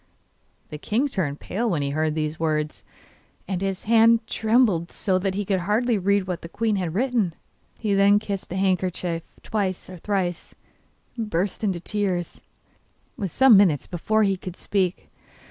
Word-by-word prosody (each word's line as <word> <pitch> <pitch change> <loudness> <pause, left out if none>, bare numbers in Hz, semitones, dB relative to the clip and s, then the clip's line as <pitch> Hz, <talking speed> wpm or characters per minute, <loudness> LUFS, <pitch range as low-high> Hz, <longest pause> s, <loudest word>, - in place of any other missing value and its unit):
The 150 - -7
king 235 - 0
turned 165 - -2
pale 230 +5 -2
when 160 -7 0
he 140 - -2
heard 155 +1 0
these 155 0 -2
words, 155 -1 -1 0.6
and 190 -1 -2
his 195 -1 -2
hand 230 0 +4
trembled 220 -8 +2
so 185 -2 0
that 190 0 -1
he 205 0 -2
could 190 -1 +1
hardly 215 +4 +1
read 200 +1 +2
what 180 -2 -4
the 165 - -9
queen 220 +2 0
had 175 -3 -3
written. 230 -7 0 0.5
Then 200 -1 +4
he 205 - +5
kissed 200 -2 -5
the 180 - -5
handkerchief 180 -3 0 0.2
twice 190 -4 -2
or 185 - -8
thrice, 180 -2 -2 0.6
and 225 -3 -4
burst 190 +4 -1
into 190 -4 0
tears, 185 -2 -2
and - - -26 0.7
it - - -12
was 195 -4 -2
some 265 -4 +6
minutes 180 -8 +4
before 215 +5 0
he 195 -2 +1
could 180 -1 -8
speak. 190 -3 -1
190 Hz, 175 wpm, -24 LUFS, 175-210 Hz, 0.7 s, some